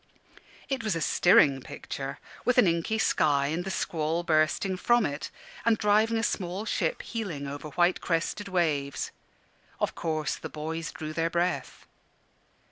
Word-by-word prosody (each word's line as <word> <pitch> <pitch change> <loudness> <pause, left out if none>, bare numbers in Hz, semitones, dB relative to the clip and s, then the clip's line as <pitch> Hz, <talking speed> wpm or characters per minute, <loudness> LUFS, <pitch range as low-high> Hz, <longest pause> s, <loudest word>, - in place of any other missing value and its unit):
It 270 -3 -2
was 215 -5 0
a - - -1
stirring 145 -5 +5
picture, 135 +2 -6 0.3
with 250 - +2
an 245 - +7
inky 170 +5 +1
sky, 145 -9 +2
and 165 +3 -1
the 190 - -4
squall 165 -2 -1
bursting 160 +4 +2
from 240 +3 +3
it, 145 +1 -4 0.3
and 230 -1 +3
driving 215 +2 +3
a 225 - 0
small 190 -1 -2
ship - - -1
heeling 190 -12 -4
over 145 +2 -6
white 175 +4 +2
crested 175 +4 -1
waves. 155 -7 0 0.7
Of - - 0
course 155 -2 -2
the - - -7
boys 160 +2 -4
drew 155 0 -6
their 165 +1 0
breath. 175 +2 -2
170 Hz, 150 wpm, -28 LUFS, 155-205 Hz, 0.7 s, an